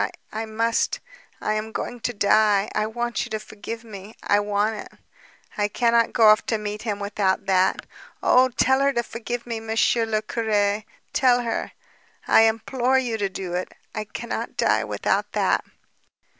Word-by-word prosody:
I 220 Hz, +1 st, -4 dB
must... 230 Hz, +1 st, 0 dB, 0.4 s
I 215 Hz, -, -1 dB
am 215 Hz, +1 st, -3 dB
going 245 Hz, +2 st, -4 dB
to 245 Hz, -, -2 dB
die... 210 Hz, -1 st, +3 dB
I 215 Hz, 0 st, 0 dB
want 240 Hz, +1 st, -2 dB
you -, -, -7 dB
to 215 Hz, -1 st, -2 dB
forgive 220 Hz, +2 st, -8 dB
me. 210 Hz, -1 st, -10 dB
I 205 Hz, -, +3 dB
want 205 Hz, +1 st, 0 dB
it... -, -, -7 dB, 0.7 s
I 205 Hz, -, +3 dB
cannot 235 Hz, +1 st, +2 dB
go 225 Hz, -3 st, +6 dB
off 215 Hz, +1 st, +5 dB
to 225 Hz, -, +1 dB
meet 210 Hz, 0 st, -5 dB
him 215 Hz, -3 st, -2 dB
without 200 Hz, -1 st, -1 dB
that. 190 Hz, -1 st, +2 dB, 0.4 s
Oh, 255 Hz, +1 st, +5 dB
tell 265 Hz, +2 st, +2 dB
her 280 Hz, 0 st, +3 dB
to 235 Hz, -, 0 dB
forgive 235 Hz, +1 st, -5 dB
me, 230 Hz, -2 st, -4 dB
Monsieur 225 Hz, +1 st, +1 dB
le 215 Hz, -1 st, 0 dB
Curé, 215 Hz, -2 st, 0 dB, 0.3 s
tell 245 Hz, -2 st, +4 dB
her... 230 Hz, -, -3 dB, 0.5 s
I -, -, +6 dB
implore 245 Hz, +3 st, +1 dB
you 245 Hz, -3 st, 0 dB
to 200 Hz, -1 st, 0 dB
do 185 Hz, -2 st, -5 dB
it. 180 Hz, +1 st, -3 dB, 0.2 s
I 215 Hz, -, -4 dB
cannot 235 Hz, +3 st, -5 dB
die -, -, +2 dB
without -, -, -1 dB
that...." -, -, +2 dB
220 Hz, 170 wpm, -24 LUFS, 205-235 Hz, 0.7 s, go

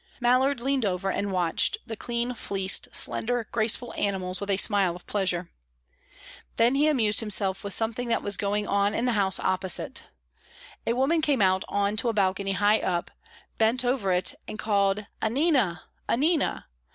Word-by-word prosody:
Mallard 255 Hz, +2 st, +2 dB
leaned 270 Hz, +1 st, 0 dB
over 190 Hz, -1 st, -1 dB
and 200 Hz, +1 st, -2 dB
watched 180 Hz, -, +1 dB
the 225 Hz, -, -6 dB
clean 240 Hz, +2 st, -3 dB
fleeced, 195 Hz, -4 st, +1 dB
slender, 240 Hz, -1 st, +1 dB
graceful 230 Hz, +1 st, +1 dB
animals 190 Hz, -2 st, -2 dB
with 200 Hz, -, -5 dB
a 195 Hz, -, +2 dB
smile 195 Hz, -4 st, +1 dB
of 180 Hz, -, -13 dB
pleasure. 180 Hz, -4 st, -2 dB, 1.1 s
Then 235 Hz, +2 st, +4 dB
he 290 Hz, +2 st, +3 dB
amused 225 Hz, -9 st, +2 dB
himself 195 Hz, -3 st, 0 dB
with 200 Hz, -2 st, +1 dB
something 230 Hz, +2 st, -2 dB
that 235 Hz, -, 0 dB
was 205 Hz, -1 st, 0 dB
going 205 Hz, +2 st, -1 dB
on 200 Hz, +1 st, +1 dB
in 235 Hz, -, 0 dB
the 250 Hz, -, +2 dB
house 195 Hz, -4 st, +1 dB
opposite. 185 Hz, -1 st, -1 dB, 0.8 s
A 230 Hz, -, +2 dB
woman 275 Hz, +7 st, +1 dB
came 290 Hz, -4 st, +1 dB
out 185 Hz, 0 st, +2 dB
on 205 Hz, +1 st, 0 dB
to 235 Hz, +2 st, 0 dB
a -, -, -1 dB
balcony 195 Hz, -1 st, 0 dB
high 205 Hz, +3 st, +3 dB
up, 175 Hz, -2 st, -2 dB, 0.5 s
bent 230 Hz, +3 st, +2 dB
over 245 Hz, -6 st, +1 dB
it, 180 Hz, 0 st, +2 dB
and 215 Hz, -, -6 dB
called, 205 Hz, -1 st, 0 dB, 0.2 s
"Annina! 240 Hz, -, +1 dB, 0.3 s
Annina!" 305 Hz, +5 st, +1 dB
210 Hz, 165 wpm, -26 LUFS, 195-240 Hz, 1.1 s, Then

